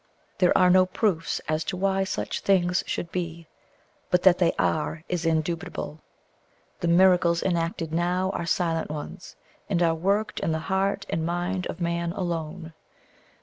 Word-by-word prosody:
There 180 - +4
are 180 -1 +5
no 185 0 +5
proofs 185 -4 0
as 155 +1 0
to 185 - -3
why 195 0 +1
such - - -3
things 180 -2 +2
should 170 - -3
be; 170 -2 -4 0.6
but 180 0 +2
that 185 -2 +6
they 175 -2 +4
are, 155 0 0
is 175 -2 -1
indubitable. 160 -1 -2 0.8
The 175 - -1
miracles 175 -1 +4
enacted 165 -3 -1
now 180 +3 +1
are 170 - -4
silent 165 -1 0
ones, 150 +3 -7 0.3
and 185 -4 +1
are 165 -1 +3
worked 200 +6 0
in 160 - 0
the - - 0
heart 190 +4 -1
and 160 - -1
mind 175 +2 -2
of - - -6
man 170 0 -1
alone. 165 -2 -4
175 Hz, 155 wpm, -26 LUFS, 165-185 Hz, 0.8 s, that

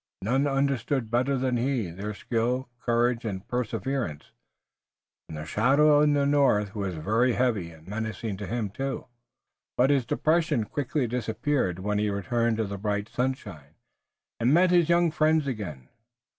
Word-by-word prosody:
None 135 +7 +1
understood 135 -3 0
better 130 +3 +1
than 125 -1 0
he 120 -7 -1
their 100 +4 -5
skill, 125 +4 -1
courage 120 0 +1
and 95 -4 -5
perseverance, 125 - -3 1.0
and 80 - -6
the 75 - -6
shadow 145 - +4
in 150 -1 +4
the 140 -1 +2
north 135 -8 +2
was 100 -4 -3
very 110 +10 +1
heavy 110 -9 0
and 80 0 -16
menacing 110 0 -4
to 100 -1 -6
him 115 -4 -2
too. 135 +5 -4 0.7
But 130 +3 +4
his 135 -4 +1
depression 160 -7 +1
quickly 140 +4 -2
disappeared 120 -3 -1
when 105 +2 -1
he 105 0 +1
returned 110 +4 0
to 110 - +1
the 100 -1 -5
bright 105 +1 -2
sunshine, 105 - -4 0.6
and 120 +2 +2
met 180 +3 +5
his 175 -2 +4
young 170 -1 +4
friends 155 -1 +2
again. 100 - -5
120 Hz, 155 wpm, -27 LUFS, 105-135 Hz, 1.0 s, met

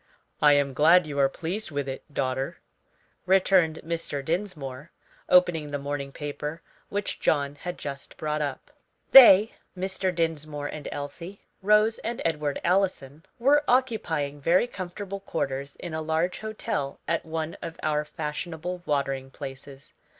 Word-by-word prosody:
"I 150 -1 +7
am 140 -1 +2
glad 165 +5 +6
you 145 -2 -4
are 135 -1 +4
pleased 180 +9 -4
with 145 -3 -3
it, 135 +3 -7
daughter," 130 -1 -2 0.7
returned 185 -4 +4
Mr. 165 -4 -3
Dinsmore, 160 -5 -4 0.4
opening 175 -4 +4
the 145 - -2
morning 140 0 -4
paper, 150 +3 -5 0.3
which 205 0 -3
John 140 -2 +1
had 175 +5 -6
just 140 -1 -7
brought 150 0 -2
up. 145 - -4 0.4
They 225 -5 +10 0.3
Mr. 190 0 -1
Dinsmore 155 -4 -2
and 145 0 -6
Elsie, 170 +7 -7 0.2
Rose 210 +3 +4
and 235 +1 -4
Edward 150 -3 -1
Allison 170 -6 0
were 285 +5 +4
occupying 165 - 0
very 175 +9 +4
comfortable 200 -2 -6
quarters 140 -7 -3
in 175 -2 -7
a 160 - -2
large 160 +3 -1
hotel 210 -10 -3
at 165 0 0
one 160 0 -4
of 165 -1 -7
our 150 -1 +1
fashionable 160 +3 -5
watering 135 -2 -1
places. 135 0 -10
160 Hz, 140 wpm, -26 LUFS, 145-180 Hz, 0.7 s, They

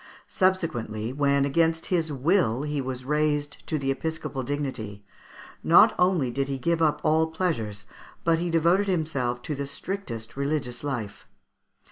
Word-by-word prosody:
Subsequently, 120 - 0
when 140 0 +2
against 165 +3 +1
his 165 -3 +1
will 140 - +2
he 150 -1 -2
was 130 -1 -5
raised 150 0 0
to 155 - 0
the 135 -2 0
episcopal 160 -1 -3
dignity, 120 -7 -4 0.6
not - - +7
only 180 -9 +3
did 135 +2 -1
he 135 -1 -2
give 165 +5 0
up 155 -2 +3
all 160 +1 +3
pleasures, 115 - -2 0.4
but 165 -1 +3
he 175 +1 -1
devoted 170 +5 +3
himself 140 -9 -1
to 150 - -3
the 140 0 -4
strictest 140 - -5
religious 140 -3 -2
life. 120 -8 -4
145 Hz, 145 wpm, -26 LUFS, 130-165 Hz, 0.6 s, not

